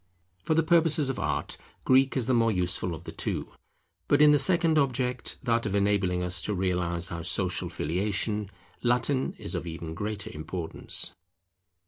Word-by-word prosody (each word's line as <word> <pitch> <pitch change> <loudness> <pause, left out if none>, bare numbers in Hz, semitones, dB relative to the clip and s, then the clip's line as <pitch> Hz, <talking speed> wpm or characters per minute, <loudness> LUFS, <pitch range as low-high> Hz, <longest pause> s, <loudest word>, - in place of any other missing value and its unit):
For 160 - +1
the 165 - +3
purposes 160 -4 +3
of - - -6
Art, - - -2 0.3
Greek 130 +1 +4
is 125 - 0
the 130 - +1
more 115 -1 +3
useful 90 -2 0
of - - -11
the - - -7
two; - - -3 0.6
but 145 - +3
in 150 0 +7
the 145 - +5
second 165 +1 +4
object, 125 -2 -1
that 115 -2 +1
of 100 - -2
enabling 100 -3 +1
us 90 +1 -1
to 105 - -2
realize 90 -1 -1
our 85 -1 -4
social 80 - 0
Filiation, 105 +5 -1 0.3
Latin 125 +2 +1
is - - -5
of - - -3
even 80 0 -6
greater 105 +2 -3
importance. 80 +2 -3
105 Hz, 165 wpm, -27 LUFS, 90-135 Hz, 0.6 s, in